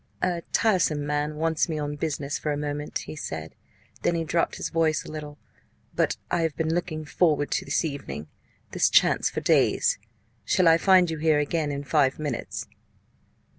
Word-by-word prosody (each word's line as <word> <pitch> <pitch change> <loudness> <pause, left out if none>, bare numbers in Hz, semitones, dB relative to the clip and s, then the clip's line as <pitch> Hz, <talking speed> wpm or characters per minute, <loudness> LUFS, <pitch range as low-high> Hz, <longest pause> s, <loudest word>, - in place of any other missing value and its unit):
"A 175 -2 0
tiresome 175 -9 +2
man 150 +1 -1
wants 160 +1 0
me 160 - -2
on 145 -1 -3
business 145 -2 -3
for 150 - -2
a 145 - -1
moment," 145 0 -3
he - - -7
said; 80 - -6 0.5
then 170 - +1
he 165 - 0
dropped 165 +1 0
his - - -4
voice 160 -2 +1
a - - -8
little; 150 -1 -7 0.6
"but - - +1
I 175 - +2
have 160 -3 -1
been 160 0 0
looking 160 -3 -2
forward 150 -2 +1
to - - 0
this 140 +4 0
evening, 140 - -5 0.5
this - - +3
chance, - - +4
for - - -4
days - - +3 0.4
shall 180 - +3
I 165 0 +6
find 185 -3 +5
you 160 - -4
here 155 -1 +3
again 150 +1 0
in 140 0 -4
five 140 -2 +2
minutes?" 145 -6 -4
155 Hz, 180 wpm, -26 LUFS, 145-165 Hz, 0.6 s, I